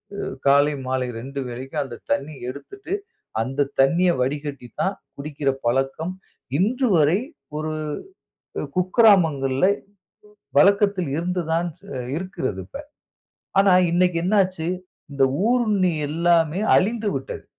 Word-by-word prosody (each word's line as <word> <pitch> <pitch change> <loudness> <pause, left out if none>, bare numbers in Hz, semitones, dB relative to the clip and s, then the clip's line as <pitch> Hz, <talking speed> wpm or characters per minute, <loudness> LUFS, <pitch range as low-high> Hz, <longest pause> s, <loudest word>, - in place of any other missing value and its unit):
அ 200 - -4 0.2
காலை, 140 +2 +5
மாலை 130 -1 -1
2 135 +3 -6
வேளைக்கு 130 +4 -7
அந்த 120 -3 -8 0.2
தண்ணீய 140 -3 -2
எடுத்துட்டு 375 - -8 0.5
அந்த 135 +4 0
தண்ணீய 170 +7 +4
வடிகட்டி 140 -1 -3
தான் 195 +1 +1 0.2
குடிக்கிற 140 -1 -2 0.2
பழக்கம், 135 +8 0 0.5
இன்று 250 +8 +1
வரை 160 +5 +4 0.4
ஒரு 155 0 -3 0.9
அ - - -2
குக்கிராமங்கள்ல 180 - +4 0.9
பழக்கத்தில் 200 -2 +4
இருந்து 180 +1 -1
தான் 170 +2 +1 0.3
அ - - -3 0.2
இருக்கிறது 185 +3 -3
இப்ப. 285 +2 -8 0.8
ஆனா, 195 -1 +5 0.2
இன்னக்கி 175 -1 +2
என்ன 200 +4 +2
ஆச்சு? 185 -3 -4 0.4
இந்த 140 -1 +1 0.3
ஊருண்ணி 210 -8 +2 0.2
எல்லாமே 165 +1 +2 0.2
அழிந்துவிட்டது. 205 - -1
165 Hz, 115 wpm, -23 LUFS, 140-185 Hz, 0.9 s, காலை